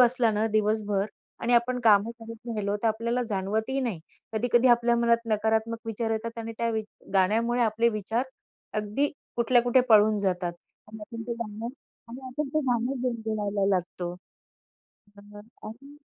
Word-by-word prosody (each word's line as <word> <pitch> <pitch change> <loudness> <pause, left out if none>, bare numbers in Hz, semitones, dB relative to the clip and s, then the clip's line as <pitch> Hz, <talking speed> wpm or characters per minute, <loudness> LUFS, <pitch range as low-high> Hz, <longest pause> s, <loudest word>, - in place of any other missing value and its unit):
असला 245 -1 +5
ना 215 +1 +1
दिवसभर 210 -2 +1 0.3
आणि 235 - 0
आपण 250 +1 +2
काम 205 -3 +7
करत 230 -1 -10
राहिलो, 205 -3 -1
तर 225 - +3
आपल्याला 235 +3 0
जाणवतही 215 +7 -1
नाही 235 -9 -2 0.3
कधी-कधी 240 +3 +3
आपल्या 240 0 +4
मनात 235 0 +2
नकारात्मक 220 +1 +1
विचार 225 0 -2
येतात 230 +1 -3
आणि 230 0 -5
त्या 235 - +1
वि 220 -1 -1 0.3
गाण्यामुळे 225 +6 +3
आपले 230 +1 +2
विचार 215 +2 -1 0.6
अगदी 210 +8 0 0.3
कुठल्या 240 +1 +4
कुठे 245 +1 +4
पळून 215 -1 +6
जातात 180 -3 -1 0.4
आणि 220 0 -10
आपण 230 +2 -7
ते - - 0
गाणं 215 0 -5 0.4
आणि 240 +3 -8
आपण 275 +3 -3
ते 310 - +3
गाणं 245 +2 0
गुणगुणायला 215 -5 -1
लागतो. 175 0 -4 1.1
अ, - - -13 0.5
आणि 275 +6 -11
225 Hz, 155 wpm, -27 LUFS, 210-240 Hz, 1.1 s, काम